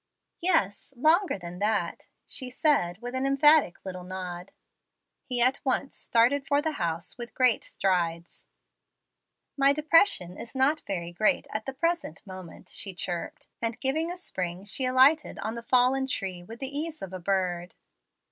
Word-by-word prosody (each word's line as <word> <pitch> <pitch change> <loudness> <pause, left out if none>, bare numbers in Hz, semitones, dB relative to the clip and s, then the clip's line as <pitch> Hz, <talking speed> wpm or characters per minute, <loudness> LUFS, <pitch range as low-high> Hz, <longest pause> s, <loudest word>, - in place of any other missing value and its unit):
"Yes; 275 - 0
longer 325 - +3
than 175 -1 -9
that," 205 -4 -1 0.2
she 255 -2 -3
said, 250 - +1
with 245 +1 -5
an 260 +1 0
emphatic 285 - +4
little 185 -1 -6
nod. 180 -1 -7 0.7
He 250 -1 -3
at 255 +3 +2
once 270 0 -1
started 260 +5 +2
for 285 0 +3
the 315 +2 -1
house 170 - -3
with 240 0 -8
great 255 -3 +3
strides. 170 -3 -2 1.1
"My 275 0 +4
'depression' 305 - +3
is 230 - -9
not 275 +4 +2
very 175 -3 -3
great 195 +5 +2
at 215 +3 -4
the 270 - -3
present 335 - -2
moment," 185 -3 -11
she 195 -2 -1
chirped, 175 -1 -4
and 230 0 -2
giving 310 +5 0
a 355 - -6
spring 185 - -5
she 235 +6 +2
alighted 260 +5 +4
on 220 - -4
the 235 - -6
fallen 255 +2 +3
tree 190 -8 -3
with 225 +6 -11
the 270 +1 -4
ease 315 -1 -3
of 190 -1 -7
a 185 - -5
bird. 180 -1 -1
235 Hz, 160 wpm, -27 LUFS, 185-275 Hz, 1.1 s, emphatic